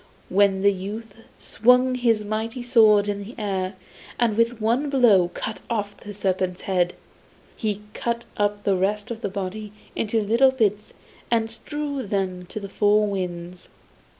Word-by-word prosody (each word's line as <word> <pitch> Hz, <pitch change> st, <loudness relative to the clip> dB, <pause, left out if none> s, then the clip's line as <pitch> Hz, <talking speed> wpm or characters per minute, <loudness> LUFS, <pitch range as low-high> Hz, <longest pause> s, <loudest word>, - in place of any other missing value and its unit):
Then 195 Hz, 0 st, +3 dB
the 200 Hz, 0 st, +5 dB
youth 205 Hz, +3 st, -6 dB, 0.2 s
swung 250 Hz, +3 st, +3 dB
his 230 Hz, -4 st, +1 dB
mighty 225 Hz, +4 st, -3 dB
sword 220 Hz, -4 st, +5 dB
in 205 Hz, 0 st, -2 dB
the 225 Hz, +5 st, -10 dB
air, 195 Hz, -3 st, -2 dB, 0.4 s
and 235 Hz, -3 st, +2 dB
with 230 Hz, +1 st, +1 dB
one 235 Hz, +7 st, +1 dB
blow 230 Hz, -10 st, +5 dB
cut 220 Hz, -, -4 dB
off 205 Hz, -3 st, -2 dB
the 205 Hz, -, -9 dB
serpent's 185 Hz, -2 st, -1 dB
head. 180 Hz, -2 st, 0 dB, 0.6 s
He 210 Hz, -2 st, -3 dB
cut 235 Hz, 0 st, -2 dB
up 205 Hz, 0 st, 0 dB
the 195 Hz, -, +2 dB
rest 205 Hz, +5 st, -1 dB
of 230 Hz, -1 st, -5 dB
the 200 Hz, -, -2 dB
body 200 Hz, +2 st, -5 dB, 0.2 s
into 225 Hz, +1 st, 0 dB
little 230 Hz, +6 st, +4 dB
bits 215 Hz, -5 st, 0 dB, 0.4 s
and 225 Hz, -1 st, +1 dB
strewed 285 Hz, -1 st, -5 dB
them 185 Hz, -3 st, -2 dB
to 215 Hz, -, -6 dB
the 200 Hz, -, -6 dB
four 210 Hz, +1 st, +3 dB
winds. 180 Hz, -3 st, -5 dB
210 Hz, 155 wpm, -24 LUFS, 195-230 Hz, 0.6 s, the